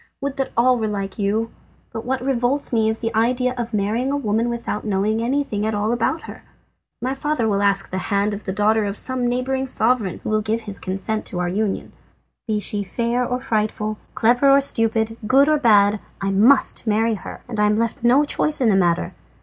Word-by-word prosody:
Would 275 0 -4
that 270 - -2
all 250 +1 +4
were 220 - -1
like 200 -1 -4
you! 215 +3 0 0.4
But 225 - -5
what 260 0 -2
revolts 265 +1 0
me 220 -1 +3
is 220 - -1
the 225 0 -3
idea 250 +3 +1
of 240 -2 -4
marrying 220 +5 0
a 285 - 0
woman 225 -2 0
without 235 -3 -4
knowing 210 +2 0
anything 240 -4 -1
at 220 0 -1
all 210 +2 0
about 240 +7 -1
her. - - -10 0.6
My 260 +2 0
father 275 -3 -1
will 200 -2 +1
ask 200 -1 +1
the 185 - -2
hand 200 +1 +1
of 205 - -7
the 190 - -2
daughter 210 +2 +2
of 200 0 -4
some 255 -2 -1
neighbouring 260 +2 -1
sovereign, 225 -6 +1
who - - -3
will 215 0 +2
give 220 +2 -2
his 205 -3 -5
consent 195 +3 -3
to 180 - -6
our 180 0 -1
union. 200 +2 -2 0.5
Be 215 -1 0
she 205 0 -2
fair 235 +5 -1
or 250 0 -2
frightful, 215 -3 -2 0.2
clever 245 +4 +3
or 275 0 +7
stupid, 225 -4 +1
good 275 +4 +5
or 305 -1 +3
bad, 210 -4 +4 0.2
I 195 0 -1
must 235 +5 +3
marry 225 +2 +2
her, 210 - -8
and 230 -3 -5
am 210 0 +3
left 230 +1 -2
no 250 +5 +5
choice 300 +1 +1
in 245 -4 +3
the 200 - +3
matter. 175 -3 +1
225 Hz, 210 wpm, -21 LUFS, 210-250 Hz, 0.6 s, or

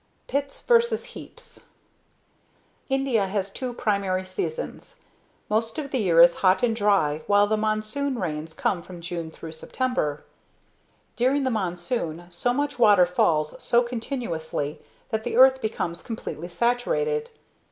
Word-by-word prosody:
Pits 280 0 -2
Versus 470 -1 +2
Heaps 480 +1 -11 1.2
India 265 -7 +1
has 195 0 -2
two 255 +4 -4
primary 200 -5 -1
seasons. 465 - -5 0.5
Most 225 +1 -1
of 285 -3 -4
the 260 - 0
year 170 -5 +6
is 170 0 +5
hot 185 +1 +4
and 230 -2 +2
dry 195 -9 +2
while 205 0 +5
the 215 +1 +1
monsoon 215 +6 -1
rains 155 -4 -4
come 180 - 0
from 175 0 -11
dune 170 -1 -5
through 160 0 -9
September. 160 - -2 0.9
During 265 +4 +2
the 260 - 0
monsoon, 175 -3 -2
so 180 +8 -1
much 285 +1 -2
water 205 -6 +6
falls 155 -3 +1
so 240 +1 +3
continuously 225 - -4 0.3
that 220 0 -1
the - - -2
earth 260 0 +7
becomes 175 -6 -2
completely 175 - -6
saturated. 455 - 0
215 Hz, 135 wpm, -25 LUFS, 175-255 Hz, 1.2 s, earth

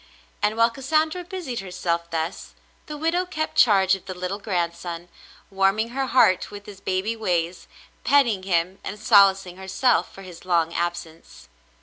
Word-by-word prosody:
And 210 +1 +1
while 230 +1 +4
Cassandra 310 +7 0
busied 345 -9 -5
herself 175 -3 -3
thus, 165 +2 -4 0.3
the 300 - -6
widow 330 +4 +1
kept 315 -4 -4
charge 195 -5 +5
of 195 - -3
the 185 - -6
little 180 +3 -4
grandson, 175 -3 -3 0.4
warm 195 +1 +2
ing 220 +1 -1
her 265 +2 -2
heart 215 -8 +3
with 205 0 -10
his 200 -2 -12
baby 190 +4 -1
ways, 180 -5 -2 0.4
petting 240 -9 +3
him 185 0 -1
and 210 - -6
solacing 195 -4 +4
herself 190 +7 +1
for 195 - -12
his 180 -3 -12
long 170 -2 +1
absence. 170 - -5
195 Hz, 155 wpm, -24 LUFS, 175-235 Hz, 0.4 s, charge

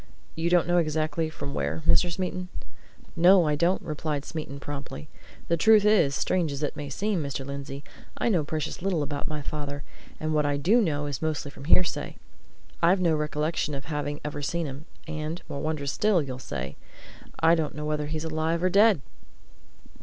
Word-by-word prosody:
You 165 +1 -1
don't 175 -1 +4
know 175 0 +3
exactly 155 0 0
from 140 -3 -6
where, 160 - -2
Mr. 175 +1 +4
Smeaton?" 180 +1 -3 0.7
"No, 180 +1 +6
I 150 - +2
don't," 170 +5 +2
replied 150 -2 -3
Smeaton, 150 -4 -5
promptly. 145 +1 -7 0.4
"The 170 - +2
truth 215 +3 +6
is, 195 -10 +4
strange 170 -1 +1
as 140 +1 -4
it 145 - -1
may 145 -1 -5
seem, 200 +5 -1
Mr. 140 -2 -4
Lindsey, 140 0 -6 0.3
I - - 0
know 180 -9 +3
precious 155 +2 -3
little 180 -5 +1
about 145 0 -4
my 150 -2 -4
father, 145 -1 -4 0.4
and 155 0 -1
what 150 -1 +3
I 145 -1 +1
do 205 +12 +4
know 145 -7 0
is 145 -2 -4
mostly 155 -3 -2
from 135 - -11
hearsay. 175 +2 +2 0.7
I've 175 +3 +5
no 170 -3 +3
recollection 150 0 -1
of 140 0 -6
having 145 -1 -3
ever 145 0 -3
seen 170 +4 -1
him. 140 +1 -7 0.2
And 155 +2 -4
more 140 - -5
wondrous 150 -3 -1
still, 210 +1 +3
you'll 130 -2 -6
say 70 - -5 0.6
I 165 +1 +5
don't 160 -3 0
know 150 0 -4
whether 150 -1 -1
he's 155 +1 -3
alive 160 +2 0
or 185 - +4
dead!" 205 -5 +5
155 Hz, 185 wpm, -27 LUFS, 145-170 Hz, 0.7 s, No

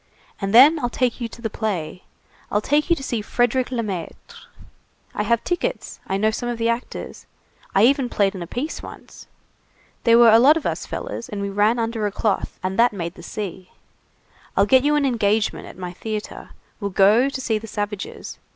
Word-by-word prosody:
And 195 0 -1
then 280 +8 +7
I'll 245 - -1
take 250 0 -1
you 235 - -1
to 235 +1 -13
the 225 - -1
play. 180 -7 -3 0.5
I'll 205 - +2
take 295 - +1
you 340 - +5
to 270 - -8
see 235 -4 -2
Frédérick 245 +3 +1
Lemaître. 210 -9 -6 0.7
I - - -2
have 230 +2 +1
tickets, 350 - -3
I 190 - -1
know 215 +2 +2
some 240 +2 -4
of 240 - -3
the 230 0 0
actors, 235 +2 -5 0.5
I 200 +3 +6
even 270 -1 +2
played 200 -3 +1
in 190 - -7
a 170 - -6
piece 275 - -4
once. - - -12 0.8
There 230 -1 +6
were 235 -1 +7
a 225 - +7
lot 290 +6 +6
of 320 - -6
us - - -2
fellers, - - -6
and 205 - -5
we 200 0 -2
ran 210 +4 +2
under 225 -2 -1
a - - -4
cloth, 205 0 -2
and 185 +2 -2
that 240 -1 +5
made 170 -3 -4
the 175 - -13
sea. 185 0 -6 0.9
I'll 200 - +5
get 260 +4 +4
you 295 +1 +3
an 295 -1 +2
engagement 220 -4 0
at - - -12
my 180 -1 -6
theatre. 215 +3 -6 0.3
We'll 200 - -2
go 205 +7 +4
to 275 - -5
see 225 -4 -1
the 225 - -10
savages. 205 -2 -5
225 Hz, 205 wpm, -22 LUFS, 200-245 Hz, 0.9 s, then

